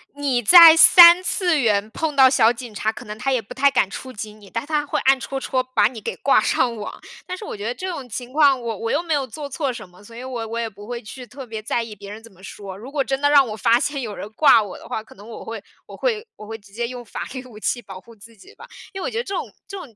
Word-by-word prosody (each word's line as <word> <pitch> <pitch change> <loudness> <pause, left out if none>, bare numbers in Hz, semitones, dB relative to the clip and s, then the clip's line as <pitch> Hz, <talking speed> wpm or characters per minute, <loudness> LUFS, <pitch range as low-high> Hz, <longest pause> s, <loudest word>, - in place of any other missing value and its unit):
你 275 -4 -1
在 330 - +9
三 340 +2 +9
次 355 -3 0
元 210 -4 +1
碰 310 +3 -3
到 265 -1 +7
小 235 -3 +4
警 240 -2 -9
察， 215 +1 -1
可 - - -11
能 210 - -7
他 270 +5 -2
也 260 - +1
不 210 - -12
太 280 +1 +3
敢 265 -7 +1
触 255 +6 -8
及 215 -2 -8
你， 210 -2 -17
但 230 +3 -4
他 300 -1 -1
会 - - -2
暗 270 0 +3
戳 270 +2 -5
戳 260 -1 -1
把 250 -5 +1
你 230 -2 -9
给 - - -5
挂 270 -5 +3
上 240 +1 0
网。 210 - -8 0.3
但 365 - -5
是 420 - -9
我 - - -6
觉 205 - -9
得 235 +3 -3
这 370 - -6
种 285 -9 -6
情 245 +3 -7
况 285 -3 +4
我 230 -3 -5
我 230 - -3
又 315 - 0
没 330 -2 -2
有 280 -3 -1
做 285 +5 -8
错 280 0 -3
什 240 - -9
么， 180 +2 -20
所 230 +3 -15
以 240 - -8
我 245 -3 -5
我 230 +1 -5
也 230 - -2
不 205 -1 -13
会 240 0 -5
去 250 +4 -10
特 260 +4 -10
别 220 -2 -7
在 235 +2 -2
意 225 -2 -10
别 200 0 -12
人 215 +2 -10
怎 230 - -15
么 185 - -21
说。 195 0 -9
如 230 +8 -11
果 285 -2 0
真 270 +1 -3
的 285 - +3
让 285 -3 +5
我 215 - -5
发 230 +3 +2
现 285 +1 -3
有 215 -4 -6
人 - - -7
挂 280 -4 +5
我 200 - -9
的 - - -14
话， 220 - -4
可 - - -18
能 205 +3 -15
我 230 - -10
会 225 -2 -7 0.2
我 - - -12
会 460 -3 -2
我 210 - -12
会 225 +1 -7
直 200 -2 -21
接 235 +2 -3
用 245 0 -9
法 - - -8
律 260 -1 -7
武 225 -4 -13
器 240 +3 -2
保 195 -2 -11
护 230 +4 -17
自 225 +2 -17
己 195 - -18
吧。 - - -14 0.3
因 385 - -6
为 - - -4
我 - - -3
觉 450 - -5
得 - - -2
这 395 -4 -5
种 - - -5
这 400 -3 -8
种 280 - -11
245 Hz, 330 characters per minute, -21 LUFS, 215-280 Hz, 0.3 s, 在